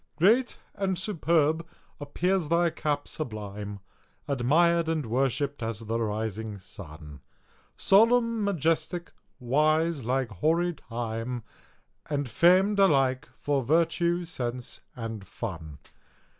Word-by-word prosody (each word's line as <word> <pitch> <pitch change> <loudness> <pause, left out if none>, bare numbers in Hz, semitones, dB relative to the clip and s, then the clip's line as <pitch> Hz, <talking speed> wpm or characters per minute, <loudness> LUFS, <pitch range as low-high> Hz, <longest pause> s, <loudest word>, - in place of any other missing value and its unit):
Great 225 +10 +3 0.2
and 190 -2 -1
superb 165 -4 +1 0.4
appears 170 +3 0
thy 170 0 +3
cap 145 -2 -2
sublime, 105 -6 -6 0.5
Admired 160 +6 +3
and 160 -4 -1
worshipp'd 135 +4 -1
as 115 -1 -3
the 115 +1 -2
rising 110 -1 -3
sun; 75 -6 -10 0.6
Solemn, 230 +2 +4
majestic, 170 -1 0 0.3
wise, 155 +4 +2
like 130 +1 0
hoary 165 - +1
Time, 115 -2 -5 0.6
And 145 -2 -1
fam'd 185 - +4
alike 135 -7 +3
for 145 -2 +1
virtue, 170 +4 +1
sense, 125 -7 -5
and 115 -3 -5
fun. 80 -11 -6
145 Hz, 100 wpm, -27 LUFS, 115-170 Hz, 0.6 s, Solemn